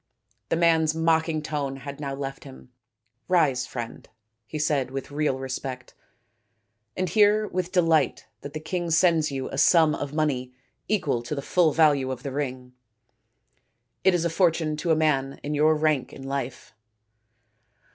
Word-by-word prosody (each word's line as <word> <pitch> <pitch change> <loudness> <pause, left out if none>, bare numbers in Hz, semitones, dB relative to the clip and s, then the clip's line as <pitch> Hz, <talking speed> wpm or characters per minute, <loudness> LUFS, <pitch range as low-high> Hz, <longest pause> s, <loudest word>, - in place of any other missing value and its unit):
The - - +2
man's 160 -2 +3
mocking 160 -1 +1
tone 145 -3 -3
had 140 +1 -8
now 140 -2 -4
left 135 0 -6
him. 130 -2 -13 0.3
" 115 +1 -50
Rise, 130 -6 +2
friend/ 120 -2 -7
5 - - -37 0.3
he 155 - -5
said 145 -4 0
with 135 +1 -6
real 145 -2 0
respect, 130 -1 -6 0.5
" 110 +1 -35
and 185 - 0
hear 210 +3 +3
with 185 0 -3
delight 165 -6 +2 0.2
that 145 0 -8
the 155 - -4
king 175 +2 -3
sends 165 -2 +3
you 135 -1 -3
a 135 - -4
sum 160 0 +5
of 145 -2 -4
money 130 -5 -1 0.3
equal 150 - 0
to 120 +5 -5
the 140 - -3
full 170 -1 +3
value 145 -4 +3
of 130 - -5
the 140 - -4
ring. 130 -2 -4 1.3
It 190 -1 +4
is 170 -1 0
a - - +2
fortune 165 -3 +1
to 170 +3 -3
a 160 - +5
man 140 -3 0
in 145 - -3
your 155 +1 +4
rank 155 -3 0
in 135 - -10
life." 135 -4 -5
150 Hz, 170 wpm, -25 LUFS, 135-160 Hz, 1.3 s, sum